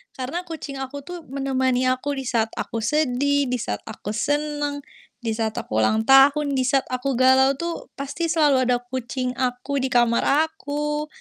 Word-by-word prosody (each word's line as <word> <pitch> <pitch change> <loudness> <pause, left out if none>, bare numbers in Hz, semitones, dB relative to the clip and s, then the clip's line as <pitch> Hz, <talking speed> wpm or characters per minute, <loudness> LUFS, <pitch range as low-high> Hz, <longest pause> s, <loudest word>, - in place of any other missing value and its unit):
Karena 280 +8 -4
kucing 290 -4 -6
aku 270 +1 -6
tuh 355 +2 -7
menemani 260 -1 0
aku 280 +3 -2
di 270 - -4
saat 230 -3 +1
aku 230 - -3
sedih, 285 +2 +1
di 250 - 0
saat 105 - -4
aku 210 +1 -6
senang, 290 +3 -1 0.4
di 230 -3 -2
saat 220 -1 -2
aku 110 - -6
ulang 220 - +1
tahun, 280 +1 +5
di 260 - +1
saat 270 +1 +1
aku 255 +2 -2
galau 260 +1 +5
tuh, 340 0 -5
pasti 310 +4 -2
selalu 290 -5 +3
ada 245 - +3
kucing 250 0 -4
aku 255 +2 -2
di - - +1
kamar 240 -1 +3 0.3
aku, 295 -1 -3
270 Hz, 170 wpm, -23 LUFS, 250-290 Hz, 0.4 s, tahun